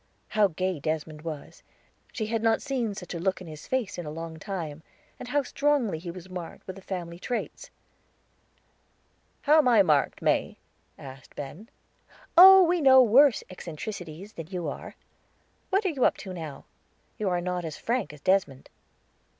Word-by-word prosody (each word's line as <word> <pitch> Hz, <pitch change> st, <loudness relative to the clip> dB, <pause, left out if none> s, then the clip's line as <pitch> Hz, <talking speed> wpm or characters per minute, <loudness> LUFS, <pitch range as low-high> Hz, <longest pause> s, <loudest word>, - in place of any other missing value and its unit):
How 215 Hz, -2 st, +3 dB
gay 185 Hz, -1 st, -2 dB
Desmond 155 Hz, +1 st, -3 dB
was! 155 Hz, -3 st, -8 dB, 0.5 s
she 220 Hz, -, -3 dB
had 225 Hz, +1 st, -1 dB
not 225 Hz, 0 st, +3 dB
seen 245 Hz, -7 st, -2 dB
such 180 Hz, -2 st, -8 dB
a 170 Hz, -, -4 dB
look 190 Hz, +2 st, 0 dB
in 185 Hz, -, -10 dB
his 155 Hz, -2 st, -10 dB
face 230 Hz, -8 st, -2 dB
in 175 Hz, -, -5 dB
a -, -, -3 dB
long 160 Hz, +1 st, -7 dB
time. 165 Hz, -5 st, -5 dB, 0.4 s
And -, -, -8 dB
how 285 Hz, +3 st, +1 dB
strongly 275 Hz, -, 0 dB
he 175 Hz, +1 st, -7 dB
was 180 Hz, +1 st, -9 dB
marked 180 Hz, -3 st, -8 dB
with 185 Hz, -, -7 dB
the 195 Hz, -, -11 dB
family 175 Hz, -3 st, -6 dB
traits. 240 Hz, +5 st, -5 dB, 1.7 s
"How 300 Hz, +2 st, +5 dB
am 295 Hz, -, +3 dB
I 230 Hz, -5 st, +6 dB
marked, 150 Hz, -5 st, +2 dB
May?" -, -, +1 dB, 0.4 s
asked 135 Hz, -1 st, -12 dB
Ben. 145 Hz, +10 st, -8 dB, 0.7 s
"Oh, 380 Hz, +2 st, +10 dB
we 350 Hz, 0 st, +2 dB
know 265 Hz, -2 st, +8 dB
worse 255 Hz, +2 st, +5 dB
eccentrics 185 Hz, +3 st, -7 dB, 0.3 s
than 165 Hz, -6 st, -8 dB
you 175 Hz, -3 st, -4 dB
are. 145 Hz, -, -7 dB, 0.7 s
What 395 Hz, +2 st, +1 dB
are -, -, +3 dB
you 275 Hz, -6 st, -1 dB
up -, -, +3 dB
to 190 Hz, -, -8 dB
now? 155 Hz, -6 st, -8 dB, 0.5 s
You 210 Hz, -3 st, 0 dB
are 180 Hz, -1 st, 0 dB
not 180 Hz, 0 st, -3 dB
as 160 Hz, -3 st, -6 dB
frank 245 Hz, -5 st, -2 dB
as 150 Hz, -1 st, -14 dB
Desmond." 185 Hz, -7 st, 0 dB
185 Hz, 175 wpm, -27 LUFS, 160-240 Hz, 1.7 s, Oh